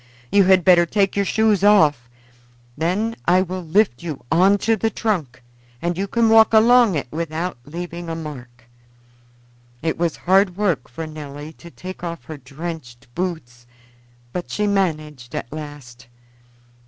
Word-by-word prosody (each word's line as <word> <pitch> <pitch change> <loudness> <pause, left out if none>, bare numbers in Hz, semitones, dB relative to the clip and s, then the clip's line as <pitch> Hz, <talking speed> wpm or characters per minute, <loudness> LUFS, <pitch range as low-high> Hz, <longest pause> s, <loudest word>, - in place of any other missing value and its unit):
You 200 -1 +5
had 185 -2 +4
better 175 -2 +6
take 195 +1 +1
your 200 0 +1
shoes 215 -2 +2
off; 150 - +4 0.7
then 190 +9 -1
I 180 +2 +4
will 185 0 -5
lift 175 - +1
you 155 -7 -7
on 190 +4 +4
to 225 0 +3
the 225 +1 0
trunk 165 - -3 0.4
and 175 +4 -2
you 195 +3 -2
can 230 +3 +2
walk 225 0 +6
along 230 -2 +5
it 140 - -3
without 165 -1 -4
leaving 170 +2 -7
a 165 - -3
mark." 130 -7 -9 1.2
It 160 0 -1
was 170 -2 0
hard 190 0 +2
work 185 -11 0
for 160 +7 -6
Nelly 150 0 -9
to 170 - -14
take 185 +2 -9
off 170 -6 -5
her 155 +2 -8
drenched 135 -3 -9
boots, 140 -9 -5 0.7
but 180 - -5
she 210 - -1
managed 155 -10 -2
at 120 - -5
last. 145 -6 -10
170 Hz, 155 wpm, -21 LUFS, 150-195 Hz, 1.2 s, better